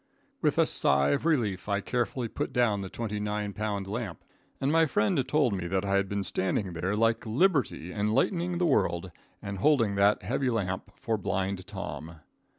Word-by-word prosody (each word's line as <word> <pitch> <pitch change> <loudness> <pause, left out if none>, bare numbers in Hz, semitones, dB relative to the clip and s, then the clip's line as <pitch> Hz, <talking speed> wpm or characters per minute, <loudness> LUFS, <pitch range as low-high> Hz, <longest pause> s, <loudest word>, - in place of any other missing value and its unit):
With - - +2
a - - +5
sigh 70 0 +3
of 160 - 0
relief 105 - 0
I 100 0 +1
carefully 120 +3 -1
put - - -4
down 115 -5 +2
the 95 - -5
twenty 105 0 -4
nine 105 0 -2
pound 105 -1 -2
lamp, 100 -2 -5 0.4
and 135 - +1
my 165 0 +4
friend 180 -4 +1
told 140 -5 +2
me 90 -3 -3
that 95 +2 -1
I 100 - 0
had 100 0 +2
been 100 -1 -1
standing 95 +1 -1
there 90 +5 -1
like 115 +1 +2
liberty 120 - +1
enlightening 170 - +1
the 175 - +1
world, 95 - +1 0.3
and 100 -1 -5
holding 115 -4 +3
that 100 +1 +3
heavy 130 +6 0
lamp 95 -6 -2
for 110 -2 -2
Blind 95 -1 -2
Tom. 80 +2 -6
105 Hz, 180 wpm, -28 LUFS, 95-125 Hz, 0.4 s, a